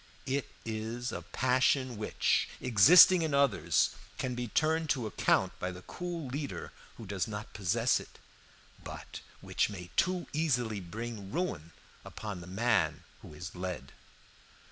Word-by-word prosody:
It 135 Hz, 0 st, -1 dB, 0.2 s
is 115 Hz, +3 st, -3 dB
a -, -, -5 dB
passion 130 Hz, 0 st, +1 dB
which, 105 Hz, 0 st, +1 dB
existing 165 Hz, -, +8 dB
in 155 Hz, -3 st, 0 dB
others, 140 Hz, -2 st, +3 dB, 0.3 s
can 130 Hz, -, -2 dB
be 120 Hz, 0 st, -3 dB
turned 160 Hz, +6 st, +1 dB
to 125 Hz, -5 st, +1 dB
account 110 Hz, -, +1 dB
by 90 Hz, -, -2 dB
the 90 Hz, 0 st, -10 dB
cool 175 Hz, -, -5 dB
leader 140 Hz, +2 st, -5 dB, 0.3 s
who 115 Hz, -, -9 dB
does 95 Hz, -3 st, -2 dB
not 105 Hz, -1 st, -7 dB
possess 95 Hz, -4 st, +1 dB
it, -, -, -13 dB, 0.7 s
but -, -, -8 dB, 0.2 s
which -, -, 0 dB
may 90 Hz, -4 st, -8 dB
too 180 Hz, 0 st, +1 dB
easily 125 Hz, -9 st, 0 dB
bring 105 Hz, +2 st, -7 dB
ruin 160 Hz, -, -2 dB, 0.3 s
upon 105 Hz, -4 st, -7 dB
the 85 Hz, -, -10 dB
man 95 Hz, -6 st, +1 dB, 0.2 s
who 75 Hz, -, -12 dB
is 80 Hz, +1 st, -7 dB
led. 90 Hz, -7 st, -5 dB
115 Hz, 145 wpm, -31 LUFS, 95-140 Hz, 0.7 s, existing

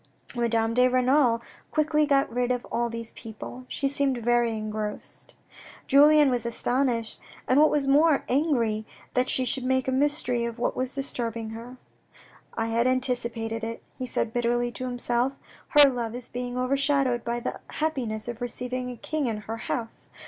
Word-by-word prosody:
Madame 230 Hz, -1 st, +1 dB
de 250 Hz, +1 st, +5 dB
Renal 255 Hz, -2 st, +3 dB, 0.3 s
quickly 305 Hz, -1 st, +2 dB
got 275 Hz, -1 st, +3 dB
rid 245 Hz, 0 st, 0 dB
of 245 Hz, -1 st, -2 dB
all 235 Hz, +1 st, 0 dB
these 230 Hz, -1 st, -6 dB
people. 235 Hz, +3 st, -9 dB
She 275 Hz, -, -1 dB
seemed 275 Hz, -2 st, 0 dB
very 240 Hz, 0 st, +2 dB
engrossed. 215 Hz, 0 st, -6 dB, 0.5 s
Julien 295 Hz, 0 st, +6 dB
was 245 Hz, -1 st, 0 dB
astonished, 235 Hz, 0 st, 0 dB, 0.3 s
and 260 Hz, -, +4 dB
what 310 Hz, -, +6 dB
was 290 Hz, -2 st, +1 dB
more, 290 Hz, +2 st, +4 dB
angry 245 Hz, -7 st, +1 dB, 0.3 s
that 250 Hz, 0 st, +1 dB
she 260 Hz, -, +2 dB
should 260 Hz, +1 st, 0 dB
make 260 Hz, 0 st, +1 dB
a -, -, +1 dB
mystery 265 Hz, -3 st, +1 dB
of 235 Hz, 0 st, -4 dB
what 240 Hz, -, -1 dB
was 255 Hz, +1 st, -2 dB
disturbing 230 Hz, -5 st, -3 dB
her, 235 Hz, +3 st, -9 dB, 0.4 s
" -, -, -22 dB, 0.3 s
I 225 Hz, -, -1 dB
had 230 Hz, +2 st, +1 dB
anticipated 235 Hz, -3 st, 0 dB
it," 230 Hz, 0 st, -5 dB
he 255 Hz, -, -5 dB
said 225 Hz, -2 st, -1 dB
bitterly 240 Hz, 0 st, 0 dB
to 255 Hz, -, -6 dB
himself. 245 Hz, +1 st, 0 dB, 0.2 s
" -, -, -26 dB
Her 290 Hz, -, +10 dB
love 240 Hz, -3 st, -2 dB
is 245 Hz, -1 st, -5 dB
being 245 Hz, 0 st, -4 dB
overshadowed 270 Hz, -1 st, +1 dB
by 235 Hz, 0 st, -2 dB
the -, -, -4 dB
happiness 245 Hz, -9 st, -2 dB
of 240 Hz, 0 st, -6 dB
receiving 250 Hz, +1 st, -3 dB
a 245 Hz, -, -7 dB
King 300 Hz, +2 st, -2 dB
in 225 Hz, -2 st, -2 dB
her 225 Hz, +2 st, -6 dB
house. 230 Hz, 0 st, -5 dB
245 Hz, 175 wpm, -26 LUFS, 230-270 Hz, 0.5 s, Her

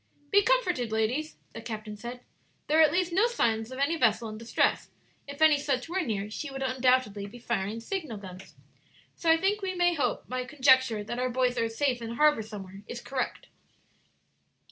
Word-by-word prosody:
"Be 405 Hz, -, +6 dB
comforted, 365 Hz, -, +1 dB
ladies," 240 Hz, +8 st, -1 dB, 0.2 s
the 230 Hz, -, -7 dB
captain 215 Hz, -2 st, -6 dB
said; 240 Hz, +3 st, -8 dB, 0.4 s
"there 310 Hz, +2 st, +2 dB
are -, -, +9 dB
at 310 Hz, -, +6 dB
least 360 Hz, -1 st, 0 dB
no 405 Hz, +6 st, +4 dB
signs 225 Hz, -, 0 dB
of 260 Hz, -, -7 dB
any 285 Hz, +5 st, +1 dB
vessel 230 Hz, -4 st, +2 dB
in 215 Hz, -, -7 dB
distress; 230 Hz, +1 st, 0 dB, 0.4 s
if 280 Hz, +2 st, -2 dB
any 310 Hz, -2 st, +6 dB
such 275 Hz, -2 st, -1 dB
were 370 Hz, +3 st, -1 dB
near, 210 Hz, -, -2 dB
she 295 Hz, +6 st, -5 dB
would 270 Hz, 0 st, -5 dB
undoubtedly 255 Hz, -6 st, +1 dB
be 210 Hz, -, -11 dB
firing 225 Hz, -2 st, -2 dB
signal 300 Hz, -, -4 dB
guns. 190 Hz, -1 st, -11 dB, 0.6 s
So 335 Hz, -, -1 dB
I 325 Hz, -, +6 dB
think 400 Hz, +5 st, 0 dB
we 375 Hz, -1 st, -3 dB
may 350 Hz, 0 st, +3 dB
hope 300 Hz, -, -1 dB
my 255 Hz, 0 st, -3 dB
conjecture 260 Hz, -4 st, +3 dB
that 240 Hz, +4 st, -5 dB
our 255 Hz, 0 st, 0 dB
boys 250 Hz, 0 st, +1 dB
are 230 Hz, 0 st, +1 dB
safe 245 Hz, +1 st, 0 dB
in 230 Hz, 0 st, -5 dB
harbor 300 Hz, -3 st, +4 dB
somewhere, 200 Hz, -3 st, -9 dB
is 240 Hz, -, -6 dB
correct." 260 Hz, +1 st, -4 dB
255 Hz, 190 wpm, -28 LUFS, 225-310 Hz, 0.6 s, are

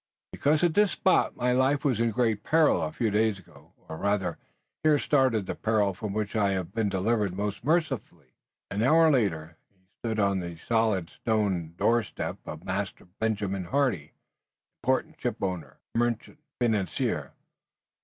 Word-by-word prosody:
"Because 150 Hz, +3 st, +1 dB
at 175 Hz, -2 st, +3 dB
this 205 Hz, +2 st, +3 dB
spot 190 Hz, -, +2 dB
my 125 Hz, 0 st, +1 dB
life 130 Hz, +3 st, +2 dB
was 125 Hz, -6 st, +2 dB
in 115 Hz, 0 st, +2 dB
great 115 Hz, -2 st, +1 dB
peril 160 Hz, +5 st, +3 dB
a -, -, -2 dB
few 115 Hz, -8 st, -1 dB
days 110 Hz, 0 st, +2 dB
ago, 85 Hz, -2 st, -18 dB
or 80 Hz, -, -6 dB
rather, 95 Hz, -2 st, -1 dB, 0.4 s
here 155 Hz, -1 st, +4 dB
started 130 Hz, -8 st, +2 dB
the -, -, -3 dB
peril 105 Hz, -3 st, +1 dB
from 100 Hz, +2 st, -5 dB
which 105 Hz, +1 st, -3 dB
I 100 Hz, -2 st, +2 dB
have 95 Hz, -1 st, -3 dB
been 110 Hz, -2 st, 0 dB
delivered 100 Hz, 0 st, 0 dB
most 105 Hz, +1 st, -3 dB
mercifully." 145 Hz, -, -1 dB, 0.4 s
An 100 Hz, -, -1 dB
hour 160 Hz, +6 st, +5 dB
later 85 Hz, -, 0 dB
he 95 Hz, -2 st, -37 dB
stood 110 Hz, -2 st, -2 dB
on 100 Hz, -2 st, +2 dB
the 85 Hz, -2 st, -6 dB
solid 110 Hz, -7 st, +1 dB
stone 95 Hz, -7 st, -1 dB
doorstep 115 Hz, -1 st, 0 dB
of 80 Hz, +2 st, -7 dB
Master 95 Hz, +1 st, -4 dB
Benjamin 100 Hz, -4 st, -1 dB
Hardy, 110 Hz, -, 0 dB, 0.7 s
important 130 Hz, +6 st, -1 dB
ship 125 Hz, -, -1 dB
owner, 90 Hz, -4 st, -4 dB, 0.2 s
merchant 120 Hz, +4 st, -1 dB, 0.2 s
and 120 Hz, -2 st, +3 dB
financier. 95 Hz, -7 st, -2 dB
110 Hz, 160 wpm, -27 LUFS, 95-125 Hz, 0.7 s, hour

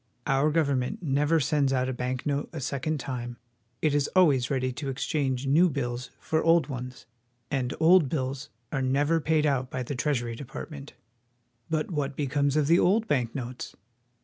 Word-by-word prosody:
Our 135 Hz, +3 st, +2 dB
government 140 Hz, -2 st, 0 dB
never 150 Hz, +2 st, +2 dB
sends 145 Hz, -1 st, +1 dB
out 130 Hz, -1 st, +1 dB
a 130 Hz, -, -2 dB
bank 125 Hz, +1 st, -3 dB
note 145 Hz, -1 st, -1 dB
a -, -, -6 dB
second 140 Hz, +3 st, -2 dB
time. 120 Hz, -2 st, -5 dB, 0.5 s
It 155 Hz, -2 st, +3 dB
is 145 Hz, -1 st, +1 dB
always 140 Hz, -9 st, +4 dB
ready 130 Hz, -2 st, 0 dB
to 135 Hz, +2 st, -5 dB
exchange 135 Hz, -1 st, -1 dB
new 160 Hz, +7 st, +4 dB
bills 125 Hz, -3 st, -3 dB
for 160 Hz, 0 st, 0 dB
old 165 Hz, 0 st, +4 dB
ones, 125 Hz, -2 st, -7 dB, 0.5 s
and 130 Hz, -3 st, -1 dB
old 165 Hz, -2 st, +5 dB
bills 135 Hz, -2 st, -3 dB, 0.2 s
are 135 Hz, -, -1 dB
never 145 Hz, +5 st, +2 dB
paid 155 Hz, 0 st, +2 dB
out 130 Hz, -3 st, 0 dB
by 130 Hz, 0 st, -3 dB
the 135 Hz, -, -4 dB
Treasury 125 Hz, -3 st, -1 dB
De 130 Hz, -, -7 dB
partment. 140 Hz, +2 st, -8 dB, 0.8 s
But 155 Hz, +2 st, -1 dB
what 145 Hz, -3 st, -2 dB
becomes 145 Hz, 0 st, 0 dB
of 150 Hz, -, +3 dB
the 170 Hz, +4 st, +4 dB
old 220 Hz, +5 st, +3 dB
bank 125 Hz, -, 0 dB
notes? 125 Hz, -2 st, -6 dB
140 Hz, 175 wpm, -27 LUFS, 130-155 Hz, 0.8 s, old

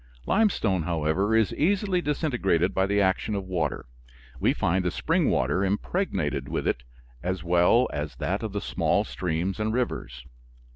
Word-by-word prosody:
Limestone, 115 Hz, -, +2 dB
however, 85 Hz, +6 st, 0 dB
is 110 Hz, -2 st, +2 dB
easily 190 Hz, +2 st, +1 dB
disintegrated 120 Hz, -, 0 dB
by 95 Hz, 0 st, +1 dB
the 100 Hz, +1 st, +1 dB
action 100 Hz, +2 st, +1 dB
of 100 Hz, -, -2 dB
water. 85 Hz, -6 st, -2 dB, 0.5 s
We -, -, +3 dB
find 90 Hz, +2 st, 0 dB
the 90 Hz, -, +1 dB
spring -, -, +1 dB
water 75 Hz, +10 st, +1 dB
impregnated 95 Hz, -, -1 dB
with -, -, -2 dB
it 60 Hz, -, 0 dB, 0.4 s
as 90 Hz, -1 st, -3 dB
well 90 Hz, +8 st, +4 dB
as 75 Hz, 0 st, -4 dB
that 95 Hz, +3 st, -2 dB
of 110 Hz, -2 st, -4 dB
the 100 Hz, 0 st, -3 dB
small -, -, +1 dB
streams 85 Hz, -, -2 dB
and 110 Hz, 0 st, 0 dB
rivers. 70 Hz, -, -3 dB
95 Hz, 155 wpm, -26 LUFS, 85-110 Hz, 0.5 s, well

